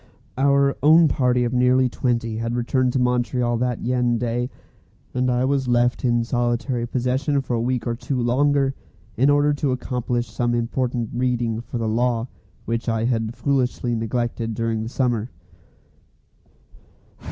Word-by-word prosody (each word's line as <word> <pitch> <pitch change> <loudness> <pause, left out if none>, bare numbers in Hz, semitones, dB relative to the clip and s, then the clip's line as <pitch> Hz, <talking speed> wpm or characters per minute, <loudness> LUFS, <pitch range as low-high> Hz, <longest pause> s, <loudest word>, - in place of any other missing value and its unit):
Our 140 +1 +2
own 160 +3 +6
party 125 -2 +2
of 120 +1 -1
nearly 125 +1 +3
twenty 115 -3 -1
had 115 +1 -2
returned 125 +1 +1
to 130 - +1
Montreal 125 -1 +1
that 125 0 -1
very 125 -1 +1
day, 120 +1 -2 0.6
and 125 0 0
I 125 +1 +1
was 135 -1 0
left 120 0 +1
in 120 -2 +2
solitary 120 0 -1
possession 130 +4 0
for 135 -2 -4
a 115 - 0
week 125 0 -1
or 120 - -1
two 125 +2 -3
longer, 135 +3 +2 0.4
in 135 +5 +3
order 145 +1 +3
to 145 -1 -1
accomplish 125 -1 -2
some 120 -1 0
important 120 0 -2
"reading" 120 -2 -1
for 120 - -6
the 115 -1 -2
law 120 +1 0 0.4
which 115 +1 -2
I 115 0 0
had 115 -1 -1
foolishly 130 -3 0
neglected 115 0 -2
during 115 -1 -1
the 110 - -4
summer. 120 -3 -1
125 Hz, 150 wpm, -22 LUFS, 120-130 Hz, 0.6 s, own